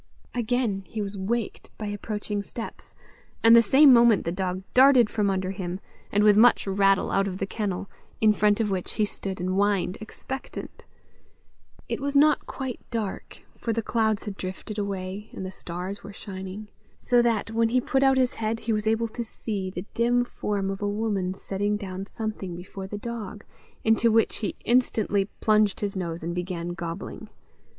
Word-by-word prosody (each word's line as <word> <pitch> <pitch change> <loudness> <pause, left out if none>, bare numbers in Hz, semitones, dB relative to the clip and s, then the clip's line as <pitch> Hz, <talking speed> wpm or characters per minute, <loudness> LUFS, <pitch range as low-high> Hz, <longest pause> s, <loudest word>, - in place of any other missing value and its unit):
Again 235 -4 0
he 220 - -6
was 200 -1 -3
waked 210 +3 -3
by 215 - -5
approaching 205 0 -3
steps, 225 +3 -8 0.5
and 230 0 +8
the 235 - +9
same 265 +5 +7
moment 235 -4 +5
the 170 - 0
dog 185 0 -2
darted 255 -3 +6
from 210 -2 +1
under 190 -1 -1
him, 185 -1 -4 0.3
and 205 +1 +3
with 210 -1 +6
much 235 +3 +6
rattle 195 0 +2
out 195 0 +2
of 185 -1 -4
the 195 - -1
kennel, 195 -2 -3 0.3
in 215 -1 +5
front 210 0 +3
of 215 -3 +1
which 185 -2 -2
he 215 - +2
stood 195 -2 -6
and 180 +1 -1
whined 195 -1 +1
expectant. 265 +4 -7 1.0
It - - -2
was 280 +1 0
not 300 +1 +4
quite 265 -3 -5
dark, 220 -5 -5
for 230 - -2
the 230 0 -1
clouds 220 -2 +1
had 200 -2 -6
drifted 190 +3 -5
away, 200 +1 -4
and 190 - -5
the 185 - -5
stars 185 +2 -5
were 200 - -9
shining, 195 +1 -7 0.3
so 245 -1 +3
that, 225 -2 +1
when 225 0 +2
he 255 +2 +3
put 265 +2 0
out 270 -1 +5
his 255 -1 +2
head, 225 0 -2
he 225 0 -1
was 210 0 -1
able 225 +1 +2
to 235 +2 -4
see 205 -4 -4
the 185 0 -6
dim 245 +1 +2
form 200 -4 -2
of 195 - -6
a 205 - 0
woman 205 -3 -1
setting 205 +2 -2
down 195 -1 -6
something 210 -6 -5
before 190 +2 -8
the 205 - -5
dog 215 -2 -6 0.4
into 225 +1 +4
which 225 0 +3
he 205 -5 -3
instantly 220 -5 +2 0.2
plunged 215 -2 +3
his 200 -1 -2
nose, 170 -3 -3
and 170 +1 -2
began 175 -1 -3
gobbling. 175 +1 -6
205 Hz, 185 wpm, -26 LUFS, 190-225 Hz, 1.0 s, the